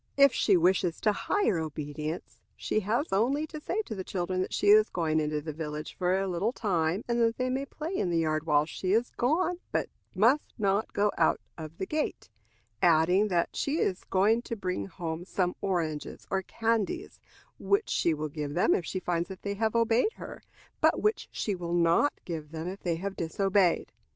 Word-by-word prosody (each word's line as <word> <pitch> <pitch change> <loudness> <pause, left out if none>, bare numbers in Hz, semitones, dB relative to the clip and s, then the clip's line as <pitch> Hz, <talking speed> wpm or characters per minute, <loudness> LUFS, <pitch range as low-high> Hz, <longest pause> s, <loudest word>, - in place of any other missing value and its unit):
If 280 -1 +7
she 195 -4 +4
wishes 175 0 +2
to 215 - +3
hire 215 - +1
obedience, 155 +1 -5 0.2
she - - -1
has 220 - -1
only 265 +10 +2
to 305 -1 -8
say 410 +8 -1
to 230 - -6
the 190 -3 -5
children 185 0 -2
that - - -3
she 205 - +1
is 215 +1 +7
going 160 -3 0
into 150 -1 -1
the 155 +1 -5
village 150 0 -5
for 180 0 +1
a 195 - -1
little 185 +5 0
time, 180 -4 0
and 235 0 +1
that 230 0 +2
they 255 0 0
may 270 +2 -2
play 315 +6 -5
in 190 - 0
the 170 - +1
yard 155 -1 0
while 150 -1 +4
she 185 +4 -2
is 230 +3 +2
gone, 335 +8 0
but - - -1 0.3
must 235 +10 +3
not 200 0 +1
go 205 0 +2
out - - +3 0.2
of 160 0 -9
the - - -2
gate; 305 - -3 0.5
adding, 175 +5 +4
that 175 -4 0
she 285 +3 0
is 185 - 0
going 210 +5 +3
to 235 - -5
bring 180 - -3
home 165 - -5
some 180 -1 -1
oranges 165 -6 -2
or 190 0 +1
candies, 230 - -2 0.4
which 405 +2 +1
she 170 - +2
will 155 +1 -3
give 145 0 -5
them 175 - +4
if - - 0
she 185 +3 -3
finds 175 -1 -1
that 190 - -9
they 200 - -2
have 220 +2 -1
obeyed 230 - +3
her, - - -9 0.4
but - - +4
which 425 +1 0
she 210 - -2
will 175 -2 -3
not 170 +11 +4
give 160 -4 -5
them 160 +1 -5
if 190 +2 -6
they 170 -2 0
have 195 +3 -4
disobeyed. 190 +1 +1
190 Hz, 200 wpm, -29 LUFS, 165-230 Hz, 0.5 s, If